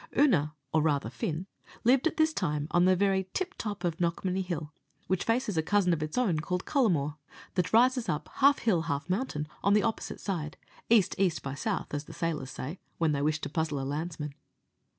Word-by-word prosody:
Oonagh, 170 - +4 0.2
or 160 - +4
rather 145 -6 +1
Fin, 155 +8 -3 0.4
lived 260 +6 +4
at - - -3
this 315 0 +3
time 150 - -1
on 175 +1 +4
the 185 0 +5
very 190 0 +1
tip 375 0 -1
top 205 -3 -5
of 170 -2 0
Knockmany 180 +2 0
Hill, 160 -4 -4 0.3
which 185 -1 0
faces 230 -5 0
a - - +4
cousin 185 +1 +2
of 160 - -2
its 155 +6 -3
own 195 -11 +2
called 180 +3 -2
Cullamore, 165 - +1 0.4
that 180 -2 0
rises 245 -1 +4
up, 150 -3 -2
half 280 +1 +6
hill, 190 -8 +2
half 145 -1 -2
mountain, 185 - -1 0.2
on 200 +1 +4
the 210 - +4
opposite 225 -1 -2
side 160 -6 -3 0.3
east 225 -6 +5
east 185 -4 +1
by 135 - -4
south, 195 +5 -3
as 145 0 -3
the - - -10
sailors 155 -6 -2
say, 150 +9 -6 0.2
when 165 -2 +2
they 140 -1 0
wish 150 +1 +1
to - - -2
puzzle 155 -1 -1
a 135 - -3
landsman. 150 0 -4
175 Hz, 205 wpm, -29 LUFS, 150-205 Hz, 0.4 s, half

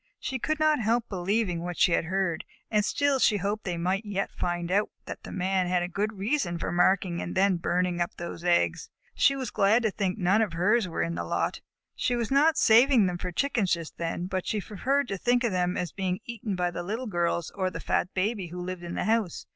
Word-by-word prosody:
She 260 - -3
could 310 +5 -1
not 310 -1 +3
help 230 +1 +1
believing 185 -1 0
what 175 0 -5
she - - +4
had 165 - +2
heard, 190 -1 -1 0.3
and 210 -1 +3
still 285 +4 +1
she 215 -4 +4
hoped 205 +3 -2
they 180 -2 -2
might 185 +4 0
yet 200 -2 -3
find 175 0 -3
out 205 +2 +2 0.2
that - - -7
the - - -9
Man 185 0 0
had 180 0 +1
a - - -2
good 205 +4 -2
reason 200 -3 -1
for - - -3
marking 175 0 +2
and 175 - -5
then 190 -1 +3
burning 175 +1 0
up 175 +3 -2
those 170 0 -6
eggs. 170 - +1 0.2
She 275 - +3
was 265 -2 -4
glad 215 +5 +3
to 220 - +1
think 195 -1 -2
that 195 - -6
none 195 +5 +4
of 210 -6 0
hers 205 +5 +2
were 165 - -2
in 165 - -2
the - - -3
lot. - - -2 0.3
She 245 - 0
was 235 -1 -2
not 300 +3 +4
saving 235 -2 +6
them 180 -1 -2
for 180 - -4
Chickens 225 -2 +1
just 170 -2 -5
then, 170 +1 -2
but 185 0 -3
she 215 - 0
preferred 260 +8 -1
to 195 -2 -3
think 245 +3 +2
of 235 - +1
them 180 -1 0
as 180 - -2
being 185 -2 -2
eaten 230 -4 -4
by 180 -1 0
the 175 - -4
Little 220 +8 -4
Girls 170 -4 -1
or 190 -2 -1
the - - -7
fat 180 - 0
Baby 195 0 -1
who 175 +2 -7
lived 180 0 -5
in 170 0 -6
the - - -1
house. 220 -5 0
190 Hz, 240 wpm, -27 LUFS, 175-220 Hz, 0.3 s, saving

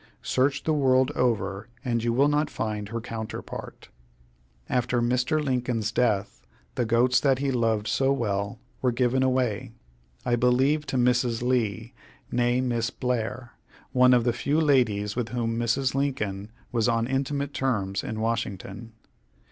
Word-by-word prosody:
Search 135 +2 +1
the 155 - +1
world 130 -2 +3
over, 105 -7 -1 0.2
and 115 -2 0
you 120 - +1
will 135 +5 +4
not 150 +1 +1
find 105 -2 -3
her 115 +1 -3
counterpart. 110 -1 -7 0.8
After 125 -1 0
Mr. 125 +5 +1
Lincoln's 125 -5 -1
death, 110 -4 0 0.3
the 120 - 0
goats 120 +2 +4
that 135 -2 +2
he 140 +1 -1
loved 115 -4 +1
so 135 0 +2
well 105 -3 -1 0.2
were 125 - +2
given 125 +2 +1
away 125 -3 0 0.5
I 120 -1 +2
believe 135 +5 +2
to 130 - -1
Mrs. 125 -1 +2
Lee, 120 -2 -1 0.4
née 120 +1 +2
Miss 120 -2 0
Blair, 120 -1 -3 0.4
one 125 0 +5
of 120 - +3
the 120 0 +1
few 140 +6 0
ladies 110 -9 +2
with 120 -2 -2
whom 115 -2 -1
Mrs. 120 +3 +1
Lincoln 110 -8 -2 0.2
was 115 -1 +1
on 115 -1 +1
intimate 140 +2 -2
terms 100 -7 -1
in 110 - -4
Washington. 110 -1 -3
120 Hz, 150 wpm, -26 LUFS, 115-130 Hz, 0.8 s, one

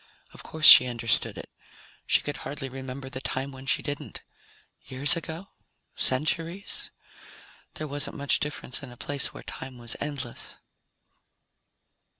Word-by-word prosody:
Of - - -10
course 160 -1 -3
she 125 - +12
understood 115 -2 -1
it. - - -10 0.6
She - - +3
could 145 - -5
hardly 135 0 -6
remember 130 +1 -8
the 130 0 -7
time 135 +1 -4
when 130 0 -12
she - - +2
didn't. 145 0 -6 0.6
Years 140 +6 +1
ago? 170 +3 -7 0.5
Centuries? 165 +8 +1 0.9
There 155 - -5
wasn't 145 0 -2
much 140 0 +1
difference 150 -3 -4
in 130 -3 -10
a 120 - -14
place 140 +2 0
where - - -11
time 130 -1 -9
was 120 0 -5
endless. 140 -5 -3
140 Hz, 140 wpm, -26 LUFS, 130-150 Hz, 0.9 s, she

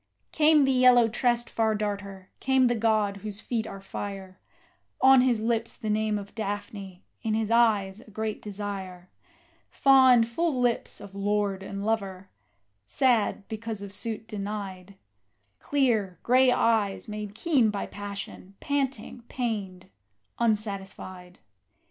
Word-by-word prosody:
Came 305 -2 +5
the 270 - +2
yellow 250 -2 +6
tressed 240 +1 0
Far 220 -1 0
darter 200 -2 -5
came 265 -1 +3
the 240 - +3
god 215 -3 +1
whose 205 0 -6
feet 225 -1 -3
are 195 - -8
fire, 195 -1 -7 0.6
On 265 -1 +7
his 245 -4 +2
lips 230 0 -1
the 215 -4 -3
name 215 0 0
of 200 0 -8
Daphne, 200 -3 -6 0.2
in 220 -2 -1
his 220 0 -1
eyes 215 -4 +3
a - - -17
great 215 0 -4
desire; 195 -3 -6 0.6
Fond, 260 -4 +5
full 290 +3 -1
lips 245 -1 0
of 200 -1 -11
lord 200 -1 -1
and 200 +1 -6
lover, 195 -4 -2 0.6
sad 220 - +1
because 220 -2 -5
of 200 - -8
suit 225 0 -4
denied; 200 -3 -6 0.6
Clear, 225 -10 0
grey 255 +1 +5
eyes 220 -5 +1
made 210 -1 -6
keen 265 -4 +2
by 205 -1 -3
passion, 200 -1 -8
panting, 275 -3 -2
pained, 205 -7 -4 0.5
unsatisfied. 195 -5 -3
215 Hz, 130 wpm, -27 LUFS, 200-235 Hz, 0.6 s, On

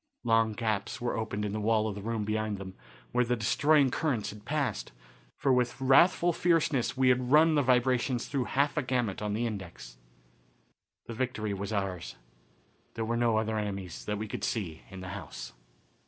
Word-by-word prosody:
Long 115 -1 +3
gaps 110 -3 -2
were 120 0 -2
opened 110 -2 -2
in 105 - -2
the 110 - -2
wall 110 0 +2
of 105 - -2
the 100 - -7
room 110 0 -2
behind 110 -1 -1
them, 95 -1 -8 0.4
where 125 0 +3
the 125 0 0
destroying 140 +5 +3
currents 130 -9 -1
had 105 0 -13
passed, 140 -7 -2 0.5
for 135 - +2
with 125 0 +1
wrathful 170 +6 +5
fierceness, 155 -8 +1
we 130 -1 +4
had 125 0 +1
run 155 +2 +6
the 150 - +3
vibrations 125 -1 +2
through 135 -3 -1
half 145 +4 0
a - - +3
gamut 125 -7 -1
on 105 -1 -1
the 120 +2 -1
index. 90 - -7 1.1
The 115 - -7
victory 110 -4 -2
was 100 +1 -4
ours. 95 -4 -3 0.8
There 115 -1 -2
were 115 +1 -1
no 115 -2 +2
other 110 0 0
enemies, 100 -4 -5
that 105 - -2
we 110 +1 -4
could - - -6
see, 95 -10 -2
in 95 -1 -9
the 95 - -7
house. 85 -10 -7
115 Hz, 185 wpm, -30 LUFS, 105-130 Hz, 1.1 s, run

